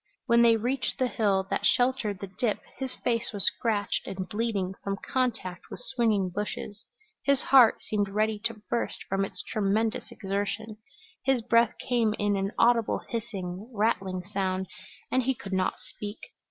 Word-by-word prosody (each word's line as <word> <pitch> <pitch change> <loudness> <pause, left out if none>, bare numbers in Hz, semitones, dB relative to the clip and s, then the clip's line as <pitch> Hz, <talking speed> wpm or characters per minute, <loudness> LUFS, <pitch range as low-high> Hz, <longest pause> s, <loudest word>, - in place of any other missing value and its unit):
When 235 -1 +5
they 230 -1 +6
reached 250 +4 -1
the 260 - +2
hill 200 -5 +1
that - - 0
sheltered 245 -6 +2
the 195 -2 -6
dip 225 -5 +1 0.2
his 265 -1 -4
face 235 -1 -1
was 205 -3 -1
scratched 210 -4 0
and 190 -1 -4
bleeding 205 -4 -1
from 195 0 -2
contact 225 -8 -2
with - - -7
swinging 225 -7 +1
bushes; 205 +2 -5 0.4
his 280 -1 +2
heart 255 -5 +6
seemed 205 -2 0
ready 215 +1 +1
to 230 -2 -2
burst 235 - -2
from 195 +1 0
its 195 - -5
tremendous 215 +1 0
exertion; 205 +2 -3 0.5
his 265 -3 +2
breath 230 0 +4
came 230 -4 +1
in 205 0 +1
an 195 0 -1
audible 235 -2 +3
hissing, 205 -3 -4
rattling 195 -4 0
sound, 190 -1 0 0.5
and 260 - +3
he 265 +1 +1
could 195 -4 -7
not 185 -1 +1
speak. 205 +1 -7
215 Hz, 160 wpm, -28 LUFS, 195-235 Hz, 0.5 s, they